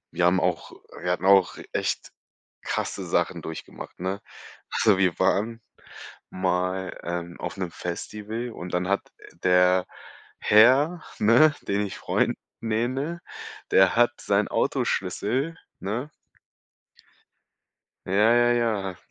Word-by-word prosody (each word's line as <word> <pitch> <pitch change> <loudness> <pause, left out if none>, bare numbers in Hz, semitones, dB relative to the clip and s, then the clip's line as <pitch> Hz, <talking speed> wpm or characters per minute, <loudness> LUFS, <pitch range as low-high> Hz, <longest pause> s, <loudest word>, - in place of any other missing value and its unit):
wir 90 - 0
haben 90 +1 +3
auch 90 -2 -1 0.3
wir 90 - -2
hatten 90 +1 -2
auch 95 -1 +5
echt - - -2 0.5
krasse - - -3
Sachen - - 0
durchgemacht, 80 -1 -9
ne? 95 +2 -2 0.5
Also, 105 -4 +3
wir 90 -3 +2
waren 115 +3 +1 0.7
mal, 90 0 -1
ähm, 85 0 -5
auf - - -5
'nem 90 -3 -3
Festival 105 +7 -5
und 90 -4 -8
dann 90 +1 0
hat 100 - +2 0.4
der 90 0 +4 0.5
Herr, 135 +11 +5 0.2
ne, 125 +8 +5
den 100 +1 0
ich 100 - -7
Freund - - 0 0.2
nenne, 130 +9 -1 0.5
der 95 -1 +5
hat 120 +1 +4
seinen 100 0 +1
Autoschlüssel, 150 +7 -1 0.2
ne 120 +10 -4 2.0
Ja, 90 - -4
ja, 120 +4 +4
ja, 105 -6 0
100 Hz, 115 wpm, -25 LUFS, 90-120 Hz, 2.0 s, auch